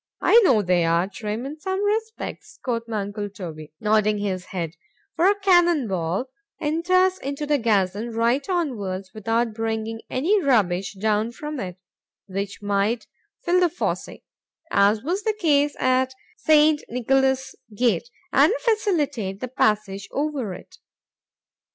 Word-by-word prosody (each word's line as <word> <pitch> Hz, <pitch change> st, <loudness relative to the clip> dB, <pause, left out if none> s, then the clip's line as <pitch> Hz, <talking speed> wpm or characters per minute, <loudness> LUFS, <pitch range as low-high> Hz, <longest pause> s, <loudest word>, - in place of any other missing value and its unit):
——I 465 Hz, -, +6 dB
know 255 Hz, -, +4 dB
they 180 Hz, -2 st, +2 dB
are, 170 Hz, +2 st, +2 dB
Trim 215 Hz, +3 st, -5 dB
in 300 Hz, +3 st, -7 dB
some 380 Hz, +4 st, -2 dB
respects,——quoth 410 Hz, -, -3 dB
my 220 Hz, -2 st, -2 dB
uncle 205 Hz, +1 st, -4 dB
Toby, 160 Hz, -6 st, -8 dB
nodding 215 Hz, 0 st, +2 dB
his 190 Hz, -3 st, -3 dB
head;—for 190 Hz, -, -3 dB
a 405 Hz, +1 st, +3 dB
cannon 345 Hz, -, +4 dB
ball 185 Hz, +3 st, -1 dB, 0.3 s
enters 365 Hz, +5 st, +2 dB
into 280 Hz, +2 st, -4 dB
the 295 Hz, -1 st, +2 dB
gazon 210 Hz, -1 st, +1 dB
right 235 Hz, -, +1 dB
onwards, 205 Hz, -, -2 dB
without 225 Hz, +1 st, 0 dB
bringing 225 Hz, 0 st, -3 dB
any 375 Hz, +11 st, +2 dB
rubbish 200 Hz, -, +1 dB
down 215 Hz, +2 st, +1 dB
with 300 Hz, +4 st, -6 dB
it, 180 Hz, -3 st, -5 dB, 0.5 s
which 200 Hz, +1 st, -5 dB
might 205 Hz, +3 st, 0 dB, 0.4 s
fill 355 Hz, +1 st, +3 dB
the 360 Hz, -, +4 dB
fossé, 340 Hz, -, -4 dB, 0.5 s
(as 205 Hz, +2 st, +3 dB
was 355 Hz, +7 st, -1 dB
the 430 Hz, -1 st, -1 dB
case 290 Hz, -4 st, +3 dB
at 255 Hz, 0 st, +2 dB, 0.2 s
St. 305 Hz, -4 st, +4 dB
Nicolas's 265 Hz, +2 st, +1 dB, 0.2 s
gate) 235 Hz, -3 st, +1 dB, 0.2 s
and 290 Hz, +7 st, +6 dB
facilitate 305 Hz, -, 0 dB
the 255 Hz, -, -4 dB
passage 210 Hz, -5 st, 0 dB
over 275 Hz, -9 st, -2 dB
it. 370 Hz, -, -14 dB
235 Hz, 135 wpm, -23 LUFS, 200-305 Hz, 0.5 s, I